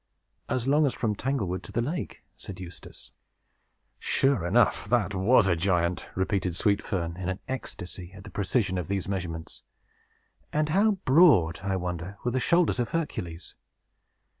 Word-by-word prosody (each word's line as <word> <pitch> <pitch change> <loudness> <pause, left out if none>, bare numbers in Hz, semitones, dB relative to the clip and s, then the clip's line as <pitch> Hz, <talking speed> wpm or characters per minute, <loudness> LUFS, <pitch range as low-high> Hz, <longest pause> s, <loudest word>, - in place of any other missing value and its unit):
"As 130 0 -1
long 145 +2 +4
as 130 - -2
from 110 -3 0
Tanglewood 105 -7 -2
to - - -10
the - - -1
lake," 160 +8 -4
said 95 -2 -9
Eustace. 90 -2 -10 0.9
"Sure 135 -9 +2
enough, 105 0 +3
that 105 -4 +2
was 100 +4 +4
a 90 -2 +3
giant!" 85 0 0
repeated 95 -2 0
Sweet 100 +1 +2
Fern, 85 -4 -3
in 95 0 -3
an 95 - -2
ecstasy 90 -8 -6
at 95 0 -11
the 100 - -11
precision 95 -1 0
of 85 - -4
these 100 -2 -2
measurements. 85 -4 -5 0.9
"And 150 0 0
how 205 +6 +4
broad, 130 - +5
I 100 -1 -1
wonder, 90 +1 -4
were 120 - 0
the 130 - 0
shoulders 170 +1 +2
of 120 - 0
Hercules?" 90 - -4
100 Hz, 160 wpm, -27 LUFS, 90-130 Hz, 0.9 s, broad